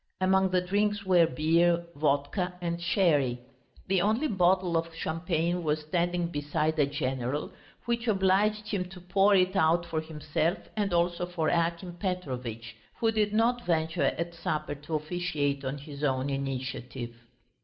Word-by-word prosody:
Among 190 0 +3
the 180 0 +2
drinks 205 +2 0
were 175 -3 +5
beer, 170 +2 +2
vodka 150 +5 0
and 170 -1 -3
sherry. 150 -9 +2 0.5
The 190 -1 +2
only 220 - +2
bottle 185 - +2
of 165 0 -1
champagne 170 +1 -1
was 155 0 0
standing 175 +3 0
beside 150 +1 -1
the 145 -3 +3
general, 135 -1 -2 0.3
which 235 0 -1
obliged 210 +1 +2
him 190 -3 -1
to 185 0 -10
pour 195 +3 +3
it 185 0 +3
out 170 0 +3
for 160 -2 -2
himself 155 +2 -1 0.2
and 205 -3 0
also 175 0 +1
for 170 -3 -1
Akim 170 +1 -1
Petrovitch, 125 - -4 0.2
who 225 -1 +1
did 215 -2 +1
not 235 +2 +1
venture 160 0 0
at 170 +1 -1
supper 155 -3 -2
to 150 +2 -5
officiate 150 -3 -1
on 135 +2 -3
his 145 0 -9
own 135 0 0
initiative. 130 -3 -4
170 Hz, 150 wpm, -29 LUFS, 150-185 Hz, 0.5 s, were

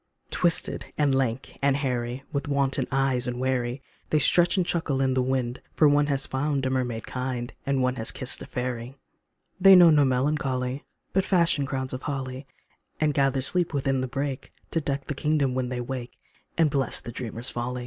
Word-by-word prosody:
Twisted 170 -2 0
and 145 -2 +2
lank 130 -1 -2
and 140 0 +3
hairy, 125 -2 -2
With 140 +2 -2
wanton 135 -2 +1
eyes 130 -2 +1
and 125 0 -3
wary, 130 0 -1 0.3
They 155 - +3
stretch 175 +4 +5
and 185 - +2
chuckle 160 -6 -1
in 135 -1 +2
the 130 - +2
wind, 125 -1 -1
For 155 - +5
one 145 0 +3
has 140 -1 +1
found 140 0 -1
a 130 - 0
mermaid 125 -3 -2
kind, 125 -1 -4
And 135 -2 +1
one 125 0 0
has 110 - -1
kissed 130 -2 -2
a - - -8
fairy. 125 0 -4 0.6
They 195 +1 +9
know 175 -2 +8
no 150 -2 +5
melancholy, 130 -1 0 0.3
But 190 - +3
fashion 170 -7 +2
crowns 130 -1 -3
of 130 - -4
holly, 135 -1 -5 0.5
And 155 -1 +2
gather 135 -1 +1
sleep 175 +2 0
within 135 -1 0
the 130 - -2
brake 135 +1 -4 0.2
To 165 - 0
deck 140 -1 -2
a - - 0
kingdom 145 -2 +1
when 130 -1 -1
they 125 -1 -3
wake, 125 0 -6 0.4
And 160 -3 +3
bless 135 -3 +2
the 120 - -8
dreamer's 120 +1 -5
folly. 125 +1 -3
135 Hz, 190 wpm, -26 LUFS, 125-145 Hz, 0.6 s, They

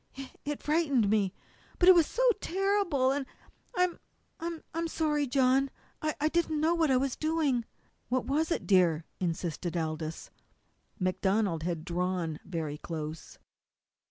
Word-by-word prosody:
"It 270 0 -8
it 295 0 -4
frightened 285 -9 +2
me. 205 -3 +2 0.5
But 355 - +3
it 370 - +11
was 335 -3 +4
so - - -1 0.2
terrible, 380 -9 +1
and 275 -1 -2 0.5
I'm 360 -1 +2 0.4
I'm 335 0 -4
sorry, 300 -3 0
John. 265 +1 +3 0.3
I 305 -1 0
didn't 315 -1 +1
know 320 +2 +3
what 330 -3 +2
I 260 - +4
was 265 0 0
doing." 310 -7 0 0.4
"What 255 +1 0
was 305 +3 +1
it, 335 - -1
dear?" 170 -5 +3
insisted 170 -1 -2
Aldous. 160 -1 -4 0.7
MacDonald 190 -1 +1
had 165 -1 -3
drawn 175 -2 -1
very 155 -4 -4
close. 155 -1 -6
260 Hz, 135 wpm, -30 LUFS, -, 0.7 s, it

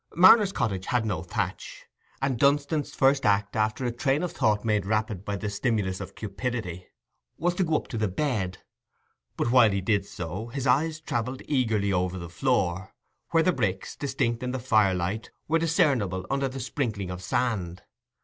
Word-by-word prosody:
Marner's 195 +3 +7
cottage 95 - -2
had 120 -2 +1
no 95 -7 -1
thatch; 85 - -4 0.4
and 130 -4 0
Dunstan's 145 +1 +1
first 135 +1 +3
act, 100 +1 +2
after 110 +3 0
a 120 - 0
train 135 +6 0
of 180 - -2
thought 105 0 +1
made 105 -3 +2
rapid 110 -3 -1
by 100 0 -3
the 100 +2 -4
stimulus 100 -2 -1
of 95 0 -8
cupidity, 105 -4 -4 0.5
was 175 +1 +1
to 185 - 0
go 160 -2 +1
up - - -1
to 115 - -3
the 110 - +1
bed; 95 -4 -1 0.8
but 120 - 0
while 125 -3 +7
he 100 -1 0
did 100 +1 0
so, 90 +6 -5
his 135 +2 -4
eyes 155 +5 +2
travelled 130 -3 -3
eagerly 110 -8 +1
over 90 0 0
the 85 -2 -7
floor, 95 -3 -1 0.3
where 165 -1 +3
the 185 - +3
bricks, 95 - -2
distinct 130 -4 -1
in 125 0 -3
the - - -1
fire 110 -6 +3
light, 90 +5 -3 0.2
were 165 +2 +2
discernible 125 - +1
under 135 0 +1
the 135 +1 -6
sprinkling 115 -8 -3
of 90 0 -6
sand. 95 -5 -1
110 Hz, 180 wpm, -27 LUFS, 95-135 Hz, 0.8 s, Marner's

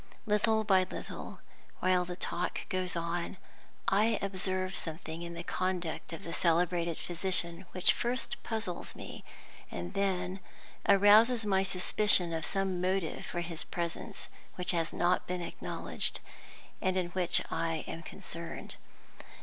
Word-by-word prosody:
Little 220 +1 +3
by 195 -3 +5
little, - - -7 0.4
while 185 -1 +3
the 180 0 -5
talk 175 0 -2
goes 185 -1 -1
on, 170 +2 -2 0.5
I 215 +3 +4
observe 185 -1 -1
something 160 0 -5
in 170 0 -6
the 170 - -5
conduct 180 -3 -2
of 165 - -7
the 165 - -5
celebrated 170 -1 +2
physician 175 0 0
which 185 -1 +3
first 245 +1 -1
puzzles 220 -6 -4
me, - - -8 0.5
and 85 0 -5
then 190 -1 0 0.5
arouses 210 +4 +7
my 190 -2 +3
suspicion 185 -1 +4
of 160 -2 -1
some 190 -2 0
motive 185 -2 -1
for 175 - -2
his 170 -2 -1
presence 170 -1 -4 0.3
which 180 0 0
has 165 -2 0
not 180 +1 +1
been 180 0 -2
acknowledged, - - 0 0.6
and 185 0 +1
in 180 -2 0
which 180 -1 +3
I 165 -1 -1
am 165 - -5
concerned. 165 0 -7
180 Hz, 135 wpm, -32 LUFS, 170-195 Hz, 0.6 s, arouses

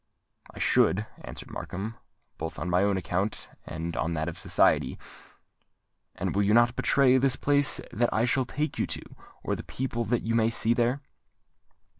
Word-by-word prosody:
"I - - -16
should," 105 +3 +3 0.2
answered - - -9
Markham; 105 +4 -5 0.5
"both 80 +1 -5
on 90 - -3
my 90 +1 +3
own 100 -1 +2
account 95 +4 -1 0.2
and 80 +1 -5
on 85 - -1
that 80 0 -2
of 85 - -5
society." - - +2 1.2
"And - - -3
you 100 - +3
will 105 +2 +3
not 120 0 +4
betray 130 -2 +4
the 130 0 +2
place 145 0 +3
that 120 +2 +1
I 110 - +2
shall 130 +2 +1
take 150 +5 -3
you - - +1
to, - - -2 0.4
or - - -1
the - - -6
people 125 -2 -3
that 120 +3 0
you 115 - -1
may 115 -1 +3
see 115 0 +3
there?" 120 +4 +1
115 Hz, 175 wpm, -27 LUFS, 95-125 Hz, 1.2 s, not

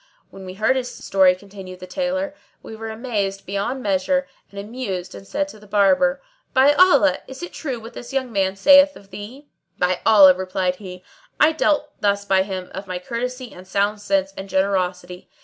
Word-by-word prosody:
When 190 -1 -11
we 185 - -8
heard 220 +6 +2
his 250 -1 -3
story 190 -2 +3
(continued 190 -1 -11
the 185 - -8
Tailor) 280 +8 -2 0.3
we 220 - -9
were 225 0 -7
amazed 215 -4 -3
beyond 205 +7 -3
measure 210 +8 0 0.2
and 200 - -9
amused 200 -4 -5
and 195 - -11
said 290 +6 -1
to 215 - -13
the 210 - -17
Barber, 205 +7 +2 0.3
"By 270 +3 +6
Allah, 355 -3 +5
is 265 +5 -9
it 350 - -7
true 265 -6 -4
what 230 +2 -11
this 240 - -9
young 260 -2 -2
man 195 -2 0
saith 280 +7 +6
of 195 -1 -16
thee?" 225 +9 -9 0.3
"By 180 0 +1
Allah," 200 -4 +8
replied 185 0 -2
he, 185 -2 -10 0.4
"I 305 - +6
dealt 300 -2 0
thus 200 0 +1
by 190 -1 +3
him 190 -2 -5
of 195 +1 -7
my 185 -1 -4
courtesy 250 +5 -5
and 185 +1 -13
sound 205 +2 0
sense 195 -1 0
and 195 0 -8
generosity. 180 -1 -1
200 Hz, 190 wpm, -21 LUFS, 190-260 Hz, 0.4 s, Allah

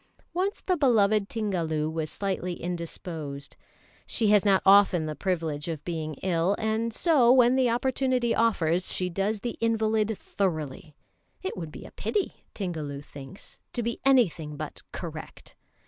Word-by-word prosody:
Once 380 +3 -1
the 370 - +2
beloved 215 - +3
Tingalu 170 -9 -1
was 160 -1 -3
slightly 190 -2 -2
indisposed. 165 -4 -6 0.5
She 220 -3 +1
has 210 -2 +5
not 195 -2 +4
often 195 -4 +6
the 155 - -3
privilege 160 -3 -2
of 160 -3 -5
being 160 -3 -3
ill, 180 +1 +2
and 220 +1 0
so, 260 -2 +4
when 250 -1 +6
the 260 -2 +3
opportunity 250 0 +1
offers, 185 -7 +2
she 180 -1 -1
does 200 +4 -1
the 240 - -4
invalid 220 -1 +2
thoroughly; 155 -5 -3 0.5
it 380 - -3
would 165 -4 -6
be - - -10
a - - -11
pity, 410 -3 -3
Tingalu 155 -7 -4
thinks, 140 +7 -10
to 240 - -2
be 235 +1 -2
anything 180 - +2
but - - -7
correct. - - -8
195 Hz, 145 wpm, -27 LUFS, 160-230 Hz, 0.5 s, often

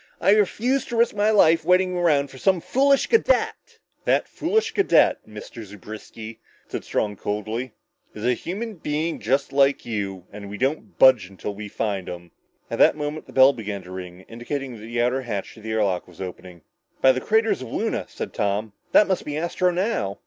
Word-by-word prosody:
I - - +4
refuse 220 +6 +2
to 240 - -5
risk 235 0 +3
my 205 +1 +2
life 165 -7 +5
waiting 180 +2 +3
around 150 -6 +2
for 130 - -12
some 190 +2 +3
foolish 275 +9 +2
cadet!" 470 +2 +1 0.3
"That - - +2
foolish 425 +7 0
cadet, 395 - +3
Mr. 115 - -9
Zewbriski," 110 +2 -10 0.3
said - - -5
Strong 105 -2 -2
coldly, 110 +5 -4 0.4
"is 105 +1 -5
a 125 - +3
human 205 - -5
being 155 +2 -2 0.3
like 140 0 +3
you 100 -5 -4
and 100 -1 -9
we 105 - -6
don't 135 +7 -2
budge 130 -8 +6
until 95 +2 -6
we 105 +1 -7
find 100 -2 -3
him!" 85 -1 -9 0.4
At - - -3
that - - +5
moment 150 +1 -4
the - - -13
bell 135 +1 +7
began 105 -5 -6
to 90 - -12
ring, 90 -1 -8
indicating 125 +5 -5
that 115 - -10
the 115 +2 -4
outer 125 +3 +1
hatch 115 -6 -5
to 110 - -15
the 110 - -7
air 110 -1 +2
lock 95 -3 -1
was 90 -2 -17
opening. 90 -2 -8 0.4
"By 130 - +6
the 130 0 -2
craters 220 - +1
of 130 - -6
Luna," - - -2
said - - -6
Tom, 105 +1 -1 0.2
"that 210 - +6
must 190 -2 0
be 150 0 -4
Astro 170 +2 0
now!" 175 - -1
130 Hz, 190 wpm, -23 LUFS, -, 0.4 s, bell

